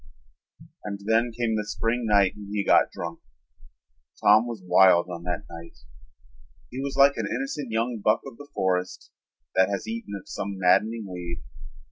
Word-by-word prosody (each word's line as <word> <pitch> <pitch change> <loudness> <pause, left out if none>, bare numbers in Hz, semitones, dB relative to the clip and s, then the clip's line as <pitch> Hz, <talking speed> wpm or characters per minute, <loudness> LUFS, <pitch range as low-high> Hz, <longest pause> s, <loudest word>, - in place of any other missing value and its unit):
And 100 -1 -5
then 115 +2 +2
came 115 -1 -1
the 105 - -1
spring 115 +2 -1
night 100 -3 +4
when 105 -1 -10
he 105 -1 -1
got - - +5
drunk. 85 -1 -6 1.0
Tom 110 +3 +5
was 115 -3 -5
wild 90 -1 +5
on 85 -1 -6
that 90 -1 -3
night. 85 -3 -11 0.9
He 125 - -6
was 140 0 -4
like 140 +1 +6
an - - -2
innocent 270 - -3
young 115 +1 -1
buck 110 - +3
of 115 - -10
the 145 0 -12
forest 90 -1 -2 0.4
that 95 0 +3
has 100 - -3
eaten 225 - -5
of - - -20
some 100 0 -5
maddening 105 +5 +2
weed. 90 -3 -6
105 Hz, 165 wpm, -25 LUFS, 95-120 Hz, 1.0 s, like